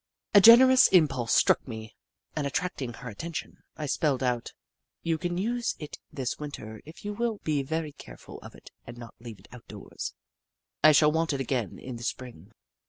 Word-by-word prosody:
A 205 - +8
generous 255 +4 +8
im 175 -5 +6
pulse 120 -4 -4
struck - - +3
me, 110 -2 -8 0.4
and, 150 -2 -1
attracting 140 -3 -3
her 125 +2 -10
attention, 155 +9 -7 0.2
I 155 - -4
spelled 140 -2 0
out: 120 -2 -1 0.3
" - - -60
You 165 -1 -1
can 175 +1 -3
use 235 +5 -1
it 150 -1 -9
this 130 -3 -4
Winter 110 -7 -8
if 160 +6 -13
you 205 - -3
will 230 0 -2
be 150 -3 0
very 155 +2 -3
careful - - -12
of - - -13
it - - -15 0.2
and 120 +1 -9
not 120 -1 -10
leave 115 -2 -10
it 95 - -18
outdoors. 125 -1 -9 0.7
I 155 - +9
shall 150 +1 +5
want 160 0 0
it 140 - -2
again 125 -6 -2
in 125 -2 -8
the 115 - -9
Spring." 115 -6 -6
145 Hz, 190 wpm, -27 LUFS, 120-165 Hz, 0.7 s, I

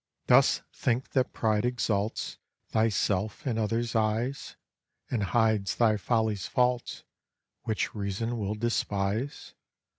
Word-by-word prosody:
Dost - - +5
think 125 +1 -1
that 130 -2 +1
pride 110 -2 +1
exalts 115 -4 -1 0.3
Thyself 110 -1 0
in 120 -4 0
other's 115 +2 -1
eyes, 110 +5 -1 0.6
And 120 - 0
hides 105 0 +2
thy 110 -2 +4
folly's 110 0 0
faults, 125 -1 0 0.6
Which 110 - -1
reason 110 +3 -2
will 105 0 -2
despise? 110 +2 -2
110 Hz, 110 wpm, -28 LUFS, 105-120 Hz, 0.6 s, Dost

